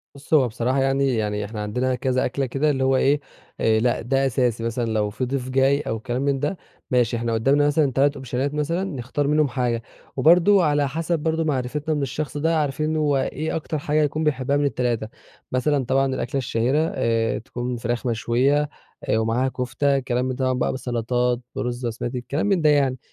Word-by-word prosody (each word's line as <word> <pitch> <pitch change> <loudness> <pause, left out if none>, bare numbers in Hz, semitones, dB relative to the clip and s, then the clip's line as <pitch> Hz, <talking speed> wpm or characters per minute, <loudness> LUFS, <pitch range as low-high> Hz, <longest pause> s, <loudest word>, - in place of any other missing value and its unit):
بُصّ، 140 +3 -8
هو 140 -5 +5
بصراحة 125 +4 0
يعني، 135 -1 +2
يعني 105 -2 -1
إحنا 105 0 -6
عندنا 125 +5 -1
كذا 130 0 0
أكلة 135 +2 -1
كده 135 +4 0
اللي 135 -2 0
هو 130 0 +3
إيه، 140 +3 +3 0.4
آآ 110 -1 +3
لأ 120 +1 +1
ده 135 +3 +1
أساسي، 120 -3 0
مثلًا 115 +1 -1
لو 110 -2 0
في 130 +5 -3
ضيف 130 0 -3
جاي 135 +2 +3
أو 115 -5 -3
كلام 125 +2 -3
من 140 -1 +1
ده 150 +7 -2 0.3
ماشي، 120 -2 +2
إحنا 115 0 -1
قُدامنا 140 +6 +3
مثلًا 145 -1 +2
3 140 +3 +2
أوبشنات 135 +1 -3
مثلًا 165 +5 -1
نختار 140 -4 -3
منهُم 150 0 +3
حاجة 120 -2 -1 0.4
وبرضه 175 +6 +5
على 145 -1 +2
حسَب 165 +3 -1
برضه 160 +1 0
معرفتنا 150 +1 -1
من 145 - -1
الشخص 140 +2 -3
ده 160 +2 +1
عارفين 155 +2 -1
هو 145 -3 +2
إيه 155 +3 -2
أكتر 155 -1 -3
حاجة 150 +1 +1
يكون 150 +2 -1
بيحبها 140 -2 +1
من 145 - +1
ال3 120 -5 -1 0.4
مثلًا 130 +1 +1
طبعًا 135 +2 +2
الأكلة 130 +2 -3
الشهيرة 125 +2 0 0.2
آآ 115 -1 +1
تكون 120 +1 -5
فراخ 120 +1 -3
مشويّة، 130 +6 +1 0.3
آآ - - +1
ومعاها 115 +4 +1
كُفتة، 130 +2 0
كلام 125 -1 -1
من 130 0 -2
ده 130 0 -1
طبعًا 130 - +2
بقى - - +1
بالسَّلطات، 125 -1 -1 0.2
بالرز 120 0 -3
البسمتي، 120 +2 -3
كلام 140 +9 -2
من 195 -4 +2
ده 155 - +4
يعني، 140 -3 +2
130 Hz, 195 wpm, -23 LUFS, 120-145 Hz, 0.4 s, هو